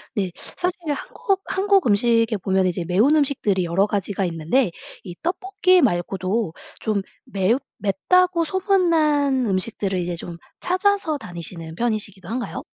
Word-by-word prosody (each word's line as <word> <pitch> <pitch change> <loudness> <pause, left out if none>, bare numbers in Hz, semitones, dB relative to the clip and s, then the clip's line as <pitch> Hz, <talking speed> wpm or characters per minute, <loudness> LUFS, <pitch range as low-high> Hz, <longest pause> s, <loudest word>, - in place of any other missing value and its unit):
네. 190 -4 -1 0.3
사실 360 +2 -1
한국 390 +6 -2
한국 390 -2 +2
음식에 230 +1 +3
보면은 190 0 +1
이제 175 -1 -3
매운 215 - +3
음식들이 220 - +1
여러 180 +4 +2
가지가 200 -1 -2
있는데 170 +6 +1 0.3
이 180 -3 -7
떡볶이 370 +1 +2
말고도 190 - 0 0.3
좀 210 -2 0 0.2
매웁 200 +6 +1 0.2
맵다고 335 - +2
소문난 310 -8 +2
음식들을 190 -1 -1
이제 175 0 -2
좀 170 0 -7 0.2
찾아서 370 -4 +1
다니시는 170 - -8
편이시기도 205 -4 -2
한가요? 240 +2 -4
220 Hz, 315 characters per minute, -22 LUFS, -, 0.3 s, 음식에